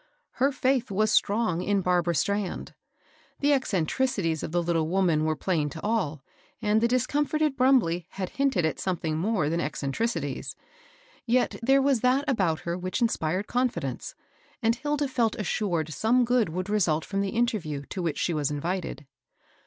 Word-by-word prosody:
Her 275 +2 +4
fidth 260 -2 +1
was 215 +2 +1
strong 205 -6 +2
in 200 +1 +1
Barbara 175 -1 +1
Strand. 200 +5 -1 0.7
The 290 0 +3
eccentricities 195 - 0
of - - -5
the 175 +1 +1
little 165 -2 +1
woman 170 -4 +2
were 155 0 +1
plain 155 -2 0
to 160 +3 -8
all, 185 -11 -1 0.4
and 215 -1 +2
the 235 - +4
discomfited 290 +4 +1
Brumbley 245 - +3
had 190 -2 -4
hinted 270 -11 +1
at 160 - -1
something 170 -4 -2
more 185 -1 0
than 165 +2 0
eccentricities; 150 +11 -2 0.7
yet 245 +2 +2
there 270 +3 +4
waa 280 0 +4
that 260 +3 +2
about 190 - +1
her 170 0 -3
which 185 +5 -3
inspired 190 -5 0
confidence, 250 +2 -2 0.5
and 225 +1 +3
Hil<* 295 +4 -2
da 290 - 0
Mi 245 -4 +1
assured 175 -6 -1
some 240 - +2
good 240 -5 +2
would 185 +3 -3
result 175 -7 +1
firom 195 -1 -2
the 200 - -1
interview 180 -12 -1
to 190 - -3
which 165 -4 -2
she 175 - 0
was 150 -3 0
invited. 160 +1 -3
195 Hz, 165 wpm, -27 LUFS, 165-245 Hz, 0.7 s, Her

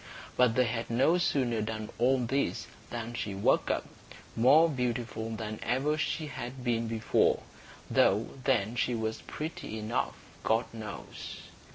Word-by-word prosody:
But 125 -2 +4
they 125 - +5
had 115 0 -2
no 135 +9 +4
sooner 125 -9 +1
done 110 0 -4
all 130 +3 +4
this 130 +3 0 0.2
than 120 0 -4
she 105 -4 -3
woke 95 - +2
up, - - 0 0.5
more 145 +8 +6
beautiful 120 -5 -2
than 110 -1 -4
ever 135 +5 +1
she 155 +1 -1
had 130 -3 -6
been 115 -2 +1
before, 110 -1 +2 0.4
though 105 +4 +3 0.2
then 115 -4 +2
she 125 0 +1
was 110 -1 -2
pretty 150 -8 -5
enough, 110 +3 -1 0.3
God 115 +2 +2
knows. 110 -2 -7
120 Hz, 145 wpm, -30 LUFS, 110-130 Hz, 0.5 s, more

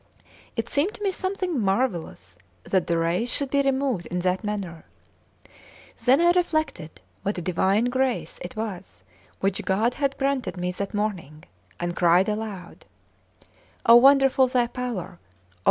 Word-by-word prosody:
It 230 -1 -2
seemed 300 - 0
to 420 - -8
me 395 - +1
something 375 -4 -2
marvellous 190 - -1 0.3
that 190 -3 0
the 170 - +1
rays 170 +9 0
should 280 -2 -1
be 280 - +3
removed 265 -8 0
in 180 - -4
that 185 +3 0
manner. 195 -6 -4 1.2
Then 260 +3 +5
I 345 +1 +5
reflected 310 - -1 0.2
what 200 - -2
divine 190 +5 +1
grace 260 0 -1
it 175 - -7
was 205 -4 -6 0.4
which 195 0 0
God 220 +6 +1
had 275 0 -1
granted 270 -6 -1
me 180 0 -2
that 200 +3 -5
morning, 180 -8 -3 0.4
and 175 0 -3
cried 175 +2 +4
aloud: 210 -4 -5 1.0
"Oh, 230 +1 +9
wonderful 270 0 +5
Thy 250 -1 +2
power! 235 -8 -5
220 Hz, 140 wpm, -25 LUFS, 180-270 Hz, 1.2 s, Oh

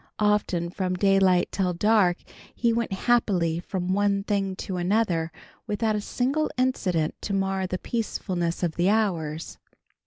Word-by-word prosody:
Often 210 -5 +1
from 185 -1 -2
daylight 190 -2 +3
till 185 -2 0
dark 195 -1 +3 0.4
he 235 -1 +2
went 235 -2 -1
happily 190 -6 +1
from 180 +1 -2
one 200 0 +1
thing 195 -2 -1
to 185 -1 -5
another, 175 -3 +1 0.4
without 215 0 0
a 210 - -1
single 275 +8 0
incident 185 -11 0
to 200 - -2
mar 195 -1 0
the 185 - -2
peacefulness 180 -6 -2
of 170 -2 -1
the 175 +2 +3
hours. 170 -8 -1
195 Hz, 145 wpm, -26 LUFS, 175-210 Hz, 0.4 s, daylight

